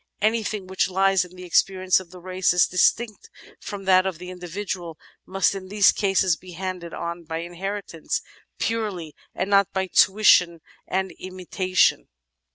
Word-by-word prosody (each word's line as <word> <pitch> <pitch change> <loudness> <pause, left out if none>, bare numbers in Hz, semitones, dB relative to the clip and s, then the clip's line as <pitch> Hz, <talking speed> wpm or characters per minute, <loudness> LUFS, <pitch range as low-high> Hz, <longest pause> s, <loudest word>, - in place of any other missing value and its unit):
Anything 215 -2 0
which 190 +1 0
lies 195 0 +3
in 180 0 -13
the 180 - -10
experience 185 +1 +2
of 185 -2 -12
the 180 +1 -12
race, 185 0 0
as 180 - +5
distinct 215 +4 +1 0.3
from 200 -2 -7
that 185 0 +4
of 185 -4 -4
the 180 +2 -8
indi 180 -1 -9
vidual, 180 -2 -5 0.3
must 195 +1 +1
in 190 -1 -7
these 205 0 +5
cases 195 -3 +2
be 180 +1 -13
handed 180 -1 -5
on 170 +1 -5
by 160 0 -4
inheritance 175 0 -4 0.3
purely 205 -9 -3 0.2
and 185 - -2
not 200 -1 +4
by 190 0 0
tuition 180 -3 +4 0.3
and 190 0 -1
imitation. 185 0 0
185 Hz, 160 wpm, -24 LUFS, 180-195 Hz, 0.3 s, as